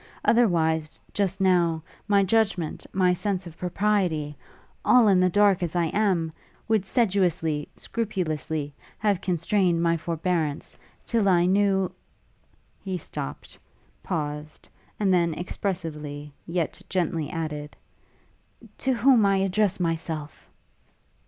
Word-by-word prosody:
Otherwise 160 Hz, -9 st, +2 dB
just 195 Hz, -1 st, -1 dB
now, 175 Hz, -4 st, +2 dB, 0.2 s
my 200 Hz, -1 st, +4 dB
judgment, 195 Hz, -5 st, 0 dB
my 185 Hz, -1 st, +3 dB
sense 190 Hz, 0 st, -2 dB
of 170 Hz, -2 st, -10 dB
propriety, 180 Hz, -5 st, 0 dB, 0.5 s
all 245 Hz, -3 st, +6 dB
in 190 Hz, -3 st, +5 dB
the 185 Hz, 0 st, +4 dB
dark 200 Hz, 0 st, +4 dB
as 175 Hz, -1 st, -2 dB
I 170 Hz, -2 st, +2 dB
am 185 Hz, -6 st, +1 dB, 0.4 s
would 220 Hz, -4 st, +2 dB
sedulously, 180 Hz, -9 st, +1 dB
scrupulously, 160 Hz, -, -3 dB, 0.2 s
have 205 Hz, -4 st, +1 dB
constrained 180 Hz, -1 st, +1 dB
my 170 Hz, 0 st, +2 dB
forbearance, 165 Hz, -2 st, -2 dB, 0.3 s
till 220 Hz, -4 st, +1 dB
I 175 Hz, -2 st, +4 dB
knew 195 Hz, 0 st, +2 dB, 0.5 s
' -, -, -38 dB
He 190 Hz, -2 st, -2 dB
stopt, 70 Hz, -, -7 dB, 0.4 s
paused, 150 Hz, -3 st, -4 dB, 0.3 s
and 195 Hz, -3 st, +3 dB
then 170 Hz, -3 st, +2 dB
expressively, 155 Hz, -6 st, -4 dB
yet 170 Hz, -2 st, -2 dB
gently 165 Hz, -4 st, -1 dB
added, 150 Hz, -3 st, -5 dB, 1.0 s
'to 265 Hz, -, +1 dB
whom 245 Hz, 0 st, +5 dB
I 195 Hz, -1 st, +3 dB
addressed 195 Hz, 0 st, +1 dB
myself!' 160 Hz, -3 st, -3 dB
180 Hz, 115 wpm, -26 LUFS, 160-200 Hz, 1.0 s, all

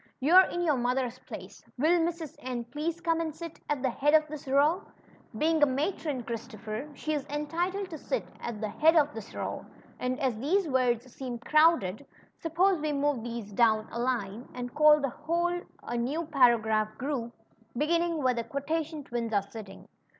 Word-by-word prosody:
You're 350 Hz, +8 st, +7 dB
in 350 Hz, -, -2 dB
your 305 Hz, -5 st, +2 dB
mother's 250 Hz, 0 st, -1 dB
place. -, -, -10 dB
Will 325 Hz, +6 st, +4 dB
Mrs. 330 Hz, -3 st, -2 dB
N 250 Hz, -2 st, -4 dB
please 305 Hz, +7 st, -3 dB
come 330 Hz, -1 st, +1 dB
and 315 Hz, -2 st, -3 dB
sit 335 Hz, 0 st, -8 dB
at 290 Hz, -3 st, -1 dB
the 260 Hz, -, +2 dB
head 295 Hz, +5 st, +3 dB
of 310 Hz, 0 st, +4 dB
this 300 Hz, -2 st, -8 dB
row? 290 Hz, +7 st, +3 dB, 0.6 s
Being 315 Hz, +4 st, +2 dB
a 295 Hz, -, +7 dB
matron, 280 Hz, -1 st, -1 dB
Christopher, 225 Hz, +2 st, -6 dB
she 310 Hz, +3 st, -2 dB
is 290 Hz, -2 st, -1 dB
entitled 345 Hz, +7 st, -2 dB
to 315 Hz, -, -6 dB
sit -, -, -2 dB
at 235 Hz, -3 st, -5 dB
the 215 Hz, -, -2 dB
head 320 Hz, +9 st, +4 dB
of 295 Hz, -2 st, +3 dB
as 250 Hz, +3 st, -4 dB
these 355 Hz, -, +2 dB
Avords 255 Hz, -4 st, +1 dB
seem 255 Hz, -1 st, -6 dB
croAvded, 285 Hz, -, +3 dB, 0.4 s
suppose 355 Hz, +4 st, +2 dB
doAvn 235 Hz, -7 st, +1 dB
a 235 Hz, -, -4 dB
line, 240 Hz, -2 st, -2 dB
and 245 Hz, -1 st, -5 dB
call 300 Hz, 0 st, +6 dB
the 275 Hz, -2 st, -1 dB
whole 340 Hz, +5 st, -1 dB, 0.2 s
a -, -, -5 dB
neAv 295 Hz, +8 st, -2 dB
paragraph 220 Hz, -5 st, +3 dB
group, 255 Hz, -4 st, -3 dB, 0.5 s
beginning 335 Hz, +4 st, +2 dB
Avhere 260 Hz, -6 st, +1 dB
the 235 Hz, -, 0 dB
Quotation 305 Hz, +4 st, -3 dB
tAvins 240 Hz, -3 st, -3 dB
are 200 Hz, 0 st, 0 dB
sitting." 215 Hz, -4 st, -10 dB
280 Hz, 165 wpm, -29 LUFS, 240-320 Hz, 0.6 s, You're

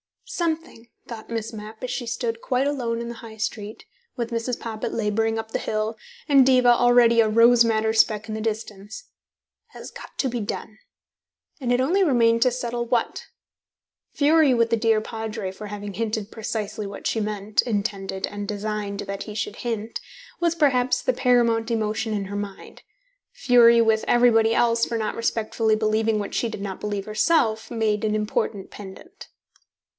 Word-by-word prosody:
"Something," 325 Hz, -8 st, -3 dB, 0.2 s
thought 225 Hz, -2 st, -9 dB
Miss 225 Hz, -1 st, -3 dB
Mapp, 215 Hz, +2 st, -9 dB
as 255 Hz, -, -3 dB
she 240 Hz, -, -4 dB
stood 230 Hz, -1 st, -3 dB
quite 255 Hz, +1 st, 0 dB
alone 240 Hz, -5 st, -1 dB
in 235 Hz, -, -5 dB
the 235 Hz, -, -6 dB
High 230 Hz, -1 st, -11 dB
Street, 220 Hz, -1 st, -5 dB, 0.3 s
with 235 Hz, -1 st, -4 dB
Mrs. 230 Hz, +1 st, -2 dB
Poppit 220 Hz, -2 st, -5 dB
labouring 225 Hz, +1 st, 0 dB
up 225 Hz, 0 st, -5 dB
the -, -, -1 dB
hill, 215 Hz, +1 st, -2 dB, 0.3 s
and 275 Hz, -3 st, +6 dB
Diva 255 Hz, -2 st, +5 dB
already 240 Hz, -1 st, +5 dB
a 225 Hz, -, +5 dB
rose 230 Hz, +2 st, +6 dB
madder 220 Hz, -1 st, +1 dB
speck 220 Hz, -1 st, +2 dB
in -, -, -3 dB
the 220 Hz, -, -4 dB
distance, 215 Hz, -, -5 dB, 0.6 s
"has -, -, -10 dB
got -, -, -12 dB
to 265 Hz, -, 0 dB
be 240 Hz, 0 st, -3 dB
done," 215 Hz, +1 st, -6 dB, 0.8 s
and 250 Hz, -3 st, -2 dB
it 245 Hz, +1 st, +3 dB
only 350 Hz, +10 st, +2 dB
remained 230 Hz, -7 st, +3 dB
to 255 Hz, -, +4 dB
settle 240 Hz, -1 st, -3 dB
what. 235 Hz, -1 st, -1 dB, 0.9 s
Fury 300 Hz, -1 st, +4 dB
with 230 Hz, -1 st, +2 dB
the 230 Hz, -, +3 dB
dear 225 Hz, -1 st, +2 dB
Padre 220 Hz, -3 st, -5 dB
for 210 Hz, +2 st, -9 dB
having 205 Hz, 0 st, -6 dB
hinted 220 Hz, 0 st, -3 dB
precisely 215 Hz, -1 st, -4 dB
what 200 Hz, -, -9 dB
she 225 Hz, -, 0 dB
meant, 210 Hz, 0 st, 0 dB
intended 200 Hz, -4 st, -2 dB
and 205 Hz, 0 st, -6 dB
designed 210 Hz, -1 st, -3 dB
that 200 Hz, 0 st, -5 dB
he 210 Hz, -, -9 dB
should 215 Hz, -1 st, -3 dB
hint, 230 Hz, -2 st, -4 dB, 0.4 s
was 340 Hz, -1 st, +1 dB
perhaps 260 Hz, -6 st, +2 dB
the -, -, +1 dB
paramount 235 Hz, -, +2 dB
emotion 220 Hz, 0 st, -1 dB
in 200 Hz, -2 st, -2 dB
her 200 Hz, +1 st, -5 dB
mind; 200 Hz, -1 st, -8 dB, 0.5 s
fury 235 Hz, -2 st, +5 dB
with 220 Hz, -1 st, +2 dB
everybody 230 Hz, -2 st, +4 dB
else 230 Hz, -1 st, +3 dB
for 230 Hz, -, -3 dB
not 215 Hz, -1 st, -2 dB
respectfully 225 Hz, -1 st, 0 dB
believing 215 Hz, 0 st, +1 dB
what 205 Hz, -1 st, -4 dB
she 235 Hz, -, 0 dB
did 215 Hz, -, -7 dB
not 195 Hz, -2 st, -5 dB
believe 205 Hz, -2 st, -3 dB
herself 220 Hz, 0 st, +1 dB
made 220 Hz, -2 st, 0 dB
an 215 Hz, -1 st, +1 dB
important 210 Hz, -2 st, -2 dB
pendant. 205 Hz, -, -11 dB
225 Hz, 175 wpm, -24 LUFS, 215-240 Hz, 0.9 s, and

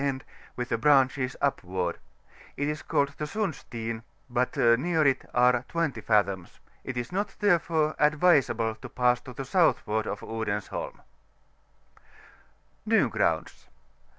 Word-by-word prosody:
end, 135 Hz, -1 st, -1 dB, 0.3 s
with 125 Hz, 0 st, -4 dB
the 115 Hz, -, +1 dB
branches 135 Hz, -1 st, +3 dB
upward; 90 Hz, -10 st, -1 dB, 0.6 s
it 145 Hz, -, -1 dB
is 150 Hz, 0 st, -3 dB
called 140 Hz, 0 st, +1 dB
the 150 Hz, -, -1 dB
Sundsteen, 120 Hz, -, -4 dB, 0.3 s
THE -, -, -17 dB
GULP 125 Hz, +1 st, +2 dB
OP -, -, -27 dB
PINLAND. -, -, -10 dB
9 115 Hz, 0 st, +5 dB
but 115 Hz, -, +2 dB
near 165 Hz, -3 st, +2 dB
it 135 Hz, -2 st, +2 dB
are 125 Hz, 0 st, +3 dB
20 165 Hz, -4 st, -2 dB
fathoms: 100 Hz, -5 st, 0 dB, 0.2 s
it 130 Hz, -2 st, -5 dB
is 120 Hz, 0 st, -3 dB
not, 200 Hz, +3 st, -2 dB
therefore, 165 Hz, -6 st, +2 dB
advisable 145 Hz, -8 st, +3 dB
to 125 Hz, +3 st, -11 dB
pass 125 Hz, 0 st, +2 dB
to 130 Hz, -, -10 dB
the 135 Hz, +2 st, -6 dB
southward 110 Hz, -, +1 dB
of 100 Hz, -, -4 dB
Odensholm. 110 Hz, -2 st, -4 dB, 1.9 s
NY -, -, +3 dB
GKOUNDS. -, -, -1 dB
130 Hz, 150 wpm, -27 LUFS, 115-150 Hz, 1.9 s, 9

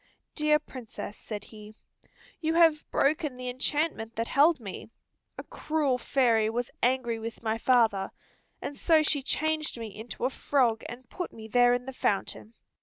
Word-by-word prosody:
"Dear 300 Hz, -1 st, +3 dB
Princess," 250 Hz, -7 st, -8 dB
said 210 Hz, -2 st, -7 dB
he, 215 Hz, 0 st, -12 dB, 0.6 s
"you 320 Hz, 0 st, 0 dB
have 325 Hz, -3 st, +4 dB
broken 295 Hz, -2 st, +1 dB
the 250 Hz, 0 st, -4 dB
enchantment 255 Hz, -3 st, -2 dB
that 230 Hz, +1 st, -2 dB
held 300 Hz, +2 st, +4 dB
me. 205 Hz, -1 st, -8 dB, 0.5 s
A -, -, -6 dB
cruel 295 Hz, -5 st, -1 dB
fairy 230 Hz, -4 st, +2 dB
was 240 Hz, +2 st, -2 dB
angry 240 Hz, -2 st, +1 dB
with 230 Hz, +1 st, -7 dB
my 220 Hz, 0 st, -1 dB
father, 225 Hz, -6 st, +3 dB, 0.5 s
and 285 Hz, -, -4 dB
so 320 Hz, -2 st, +4 dB
she 295 Hz, -2 st, +1 dB
changed 310 Hz, +1 st, -1 dB
me 225 Hz, -3 st, -7 dB
into 220 Hz, +2 st, -5 dB
a 260 Hz, -, +1 dB
frog, 245 Hz, -6 st, +1 dB
and 245 Hz, +1 st, -9 dB
put 360 Hz, -, -4 dB
me 220 Hz, -1 st, -10 dB
there 245 Hz, +1 st, +5 dB
in 245 Hz, 0 st, -4 dB
the 265 Hz, -, -6 dB
fountain. 215 Hz, 0 st, -2 dB
245 Hz, 165 wpm, -28 LUFS, 225-295 Hz, 0.6 s, there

